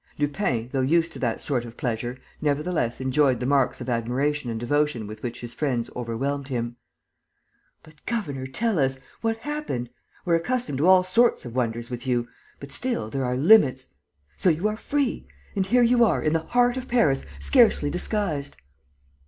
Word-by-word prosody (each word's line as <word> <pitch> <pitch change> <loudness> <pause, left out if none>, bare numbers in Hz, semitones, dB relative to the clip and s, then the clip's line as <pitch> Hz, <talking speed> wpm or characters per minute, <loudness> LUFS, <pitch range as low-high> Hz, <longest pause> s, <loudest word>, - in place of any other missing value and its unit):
Lupin, 145 - -1
though 135 - 0
used 165 +5 +2
to - - -10
that 120 -3 -1
sort 130 -5 -1
of 120 -1 -11
pleasure, 120 +1 -3 0.2
nevertheless 150 -4 0
enjoyed 130 -1 +2
the 125 - -3
marks 135 -1 +2
of 125 - -6
admiration 125 +4 -1
and 115 -1 -3
devotion 145 -1 0
with 105 +1 -9
which 120 -1 -5
his 120 0 -8
friends 125 -6 -1
overwhelmed 135 +4 -3
him: 120 -3 -3 1.1
"But, 155 -2 -19
governor, 145 - -3
tell 210 - 0
us... 135 -1 +1 0.2
what 225 -1 0
happened? 290 - -4 0.3
We're 170 -2 +3
accustomed 235 - -2
to 160 - +3
all 185 -1 +7
sorts 230 - +2
of 120 - -7
wonders 120 -1 -2
with 120 +1 -6
you; 120 -1 +1 0.3
but 140 0 -10
still, 240 - -2
there 135 -1 -1
are 125 0 -1
limits.... 135 -5 +5 0.5
So 185 - +3
you 170 +5 +1
are 215 - -3
free? 275 +3 -2 0.3
And 195 -1 0
here 245 +3 +4
you 240 0 +5
are, 225 - +2
in 155 - +1
the 165 - +3
heart 245 0 +3
of 260 0 -5
Paris, 155 - +2 0.2
scarcely 230 - +4
disguised. 175 -7 -2
140 Hz, 175 wpm, -25 LUFS, 125-190 Hz, 1.1 s, all